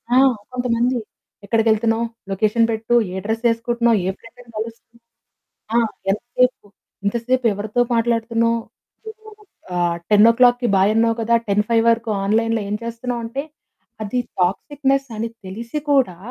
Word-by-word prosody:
ఆ! - - +6 0.4
కొంతమంది, 245 0 0 0.5
"ఎక్కడికెళ్తున్నావ్? 225 +1 +2 0.3
లొకేషన్ 215 +4 +2
పెట్టు. 225 +2 0 0.2
ఏ - - -5
డ్రెస్ 225 +2 -2
ఎసుకుంటున్నావు? 235 0 +1
ఏ - - +1
ఫ్రెండ్‌ని 235 +1 -16
కలుస్తున్నావు? 230 +1 -8 0.8
ఆ! - - +6 0.3
ఎంతసేపు? 245 +2 0 0.4
ఇంతసేపు 240 +4 0
ఎవరితో 210 +4 -2
మాట్లాడుతున్నావు? 230 0 +1 1.2
ఆహ్, 175 -1 +1
10కి 240 +3 +5
బాయ్ 195 +2 +4
అన్నావు 230 0 +2
కదా. 230 +1 +2
10:05 210 +3 +2
వరకు 230 0 0
ఆన్లైన్‌లో 225 +2 +1
ఏం 210 - -1
చేస్తున్నావు?" 235 +1 -4
అంటే 270 +5 -4 0.6
అది 215 +4 -2 0.2
టాక్సిక్నెస్ 275 +9 0
అని 225 +2 -2 0.2
తెలిసి 230 +9 -5
కూడా 265 -11 +3
230 Hz, 120 wpm, -20 LUFS, 220-240 Hz, 1.2 s, ఆ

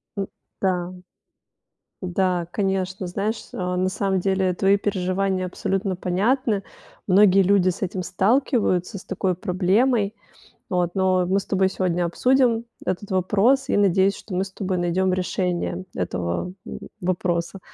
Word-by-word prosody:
У 200 - -1 0.4
да. 180 -1 0 1.1
Да, 180 -1 0
конечно. 190 -2 -1
Знаешь, 205 +5 -3
а, 180 -1 -2
на 185 +1 +1
самом 190 -1 0
деле 190 -1 +1
твои 195 +2 +3
переживания 190 -1 -1
абсолютно 190 +1 -2
понятны. 205 +4 +1 0.5
Многие 195 0 +6
люди 185 -1 +3
с 175 - -7
этим 185 0 -2
сталкиваются, 200 - +1
с - - -13
такой 190 -1 -1
проблемой. 200 +4 +1 0.6
Вот, 180 -2 0
но 185 -1 +2
мы 190 +2 +2
с - - -13
тобой 190 -1 +2
сегодня 180 -2 0
обсудим 240 +5 +2 0.2
этот 190 +2 -3
вопрос 205 +9 +2
и, - - +2
надеюсь, 195 0 +3
что 205 - -10
мы 185 - +1
с 190 - -11
тобой 190 -2 -2
найдём 180 +2 +1
решение 180 -1 -1
этого, 90 - -2
м, - - -7 0.2
вопроса. 175 0 -1
190 Hz, 140 wpm, -23 LUFS, 180-200 Hz, 1.1 s, Многие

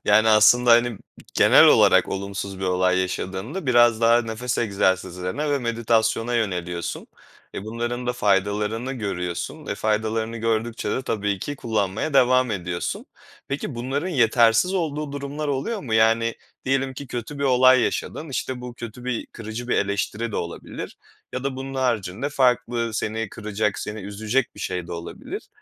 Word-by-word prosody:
Yani, 110 +2 +5
aslında, 110 +3 +6
hani, 120 -2 +4 0.4
genel - - +7
olarak - - +5
olumsuz 100 0 -4
bir - - -2
olay 90 0 +2
yaşadığında 95 - -3
biraz 120 -2 +5
daha 115 +1 +5
nefes 115 +2 -3
egzersizlerine 95 - 0
ve 145 - +2
meditasyona 115 -1 0
yöneliyorsun. 90 -6 -2 0.5
E, 95 - -5
bunların 120 +2 -3
da 125 - +1
faydalarını 105 +3 0
görüyorsun, 90 -8 -4
e, - - -2
faydalarını 110 +1 -1
gördükçe 115 +1 -1
de 130 - -1
tabii 105 -5 -1
ki 145 +9 -5
kullanmaya 110 +3 -2
devam 130 -1 +4
ediyorsun. 90 -4 -3 0.4
Peki, 140 -1 -3
bunların 135 +8 -2
yetersiz 120 - +3
olduğu 150 -4 -2
durumlar 145 +1 -4
oluyor 170 - -2
mu? 115 -9 -3
Yani, 115 +1 +3 0.3
diyelim 135 0 0
ki 140 +2 -7
kötü 125 +4 -6
bir 140 - -1
olay 130 -1 +6
yaşadın. 155 +5 -2
İşte, 130 -2 -3
bu 125 -1 -8
kötü 120 +1 -9
bir 125 -2 -2
kırıcı 115 +2 -7
bir - - +2
eleştiri 105 +3 -1
de - - -2
olabilir. 85 - -6 0.4
Ya 130 +1 -4
da 140 -1 -2
bunun 135 +1 -6
haricinde 120 -2 -1
farklı 125 -4 +1
seni 110 0 -2
kıracak, 105 0 -2
seni 105 +1 -5
üzecek 110 +6 -1
bir - - -11
şey 90 -2 -3
de - - -7
olabilir. 85 0 -7
115 Hz, 155 wpm, -23 LUFS, 105-130 Hz, 0.5 s, genel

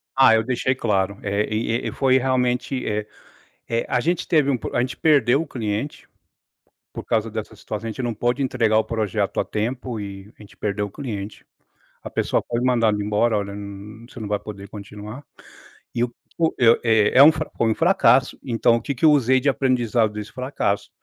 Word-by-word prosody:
Ah, 130 -3 +6
eu 110 - +2
deixei 130 +2 0
claro. 100 -5 0
É, 100 +1 0
e 115 +2 -1
e - - -1
e - - -3
foi 130 -1 +3
realmente, 125 0 0
eh 105 0 -2 0.6
eh, 115 0 -1
a 125 - +1
gente 170 +6 -1
teve 150 -4 +3
um 135 - +2
pro - - -7
a - - +2
gente 125 0 -2
perdeu 140 -3 +3
o - - -7
cliente 115 +1 -4 0.8
por - - -7
causa 110 0 0
dessa 110 0 -6
situação. 105 +2 -6
A - - -3
gente 130 - -5
não 120 -2 -2
pôde 120 +5 0
entregar 115 -4 +2
o 110 - +2
projeto 105 -3 -2
a - - 0
tempo, 120 +1 -3
e 100 +1 -8
a - - -13
gente 100 - -16
perdeu 105 0 -2
o - - -10
cliente. 105 -5 -6 0.6
A - - -7
pessoa - - 0
foi 120 - -1
mandada 115 -4 +2
embora, 105 +2 +1
"Olha 100 -1 -3
n 100 +2 -9
você 120 - -11
não 110 - -5
vai 105 0 -1
poder 100 -2 -9
continuar". 105 +5 -9 0.7
E 120 - -3
eu 120 0 -1 0.2
o 165 -1 +2
eu, 115 -2 +5
é 110 -1 +3
é 135 - +10
um 155 - +9
fra 155 0 -4
foi 115 -1 +2
um - - 0
fracasso. 165 -7 +3
Então 115 -2 +2
o 115 - -2
que 140 +5 -3
que 125 - 0
eu 155 - +8
usei 130 -2 +4
de 140 +2 +1
aprendizado 120 -5 +1
desse 105 0 -7
fracasso, 125 -6 -2
115 Hz, 210 wpm, -22 LUFS, 105-130 Hz, 0.8 s, é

